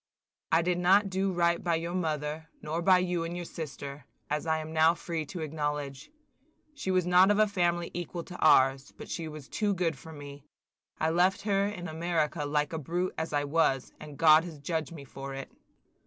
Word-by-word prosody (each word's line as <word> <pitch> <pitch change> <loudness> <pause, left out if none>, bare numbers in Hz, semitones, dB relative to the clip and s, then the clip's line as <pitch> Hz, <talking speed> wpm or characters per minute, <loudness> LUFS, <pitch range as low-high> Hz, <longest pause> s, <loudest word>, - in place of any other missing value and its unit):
I 165 +1 +4
did 175 0 0
not 195 +3 +4
do 190 +1 0
right 170 -1 +1
by 170 -2 +1
your 170 +2 -3
mother, 155 -2 -2
nor 160 +3 -3
by 185 +1 +6
you 180 -2 0
and 170 +1 -4
your 175 0 -5
sister, 140 -4 -7 0.3
as 150 +2 -1
I 160 0 +2
am 155 0 -6
now 160 +1 +5
free 165 -3 -4
to 175 +1 -6
acknowledge. 150 - -3 0.6
She 290 -10 -5
was 185 -2 +2
not 180 +2 +6
of 205 - +3
a 215 - +6
family 175 -4 0
equal 175 0 -5
to 180 - -10
ours, 135 -3 +4
but - - -10
she 165 -2 -3
was 150 -3 -9
too 205 -2 0
good 170 -3 0
for 160 +5 -12
me. 145 -2 -10 0.6
I 160 0 +1
left 185 +5 +2
her 200 -1 +2
in 180 -4 -5
America 160 -2 -1
like 150 +1 0
a 160 - -2
brute 175 +5 -2
as 160 +1 -3
I 145 -1 +1
was, 145 -3 +1
and 150 -2 -10
God 155 0 +7
has 170 -3 -8
judged 160 +2 -3
me 155 -4 -9
for 135 +1 -7
it. 135 - -7
165 Hz, 205 wpm, -29 LUFS, 150-180 Hz, 0.6 s, God